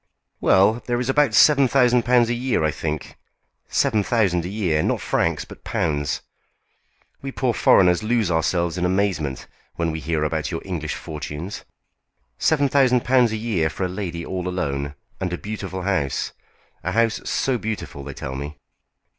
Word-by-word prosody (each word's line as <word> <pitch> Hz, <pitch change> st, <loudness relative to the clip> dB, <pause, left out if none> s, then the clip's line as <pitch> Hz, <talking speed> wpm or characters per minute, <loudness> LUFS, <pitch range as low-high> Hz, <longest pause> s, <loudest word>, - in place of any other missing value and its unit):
"Well, 105 Hz, +5 st, +4 dB
there 120 Hz, -1 st, 0 dB
is 125 Hz, +1 st, -2 dB
about 135 Hz, -4 st, +3 dB
seven 140 Hz, -1 st, +6 dB
thousand 125 Hz, -2 st, +4 dB
pounds 120 Hz, -1 st, +4 dB
a -, -, +2 dB
year, 120 Hz, -6 st, 0 dB
I 80 Hz, -, +2 dB
think! 75 Hz, -2 st, -5 dB, 0.5 s
Seven 115 Hz, -7 st, +2 dB
thousand 95 Hz, -7 st, +1 dB
a -, -, -4 dB
year! 90 Hz, -7 st, 0 dB
Not -, -, 0 dB
francs, 80 Hz, -4 st, 0 dB
but -, -, -13 dB
pounds! 75 Hz, -4 st, -1 dB, 1.0 s
We 135 Hz, -, -5 dB
poor 130 Hz, -2 st, 0 dB
foreigners 90 Hz, -4 st, +4 dB
lose 110 Hz, -4 st, +1 dB
ourselves 85 Hz, +1 st, 0 dB
in -, -, -1 dB
amazement 90 Hz, -8 st, 0 dB, 0.3 s
when 85 Hz, -1 st, -1 dB
we 80 Hz, -, -4 dB
hear 80 Hz, -1 st, -1 dB
about 75 Hz, -1 st, -1 dB
your 80 Hz, -, -4 dB
English 85 Hz, -5 st, -3 dB
fortunes. 75 Hz, +4 st, -6 dB, 0.7 s
Seven 145 Hz, -2 st, +3 dB
thousand 130 Hz, -3 st, +3 dB
pounds 125 Hz, -3 st, +4 dB
a 110 Hz, -, -2 dB
year 105 Hz, -8 st, 0 dB
for 95 Hz, -, -4 dB
a -, -, +1 dB
lady 90 Hz, -3 st, -5 dB
all 90 Hz, -1 st, -3 dB
alone, 70 Hz, -6 st, -2 dB, 0.2 s
and 90 Hz, -2 st, -2 dB
a -, -, -2 dB
beau 105 Hz, +4 st, -5 dB
tiful 95 Hz, -2 st, -5 dB
house! 90 Hz, -8 st, -1 dB, 0.5 s
A 90 Hz, -, -2 dB
house 115 Hz, 0 st, +2 dB
so 130 Hz, -3 st, 0 dB
beautiful, 95 Hz, -10 st, -5 dB
they 70 Hz, -1 st, -8 dB
tell 70 Hz, -1 st, -5 dB
me!" 70 Hz, +2 st, -6 dB
95 Hz, 170 wpm, -22 LUFS, 80-120 Hz, 1.0 s, seven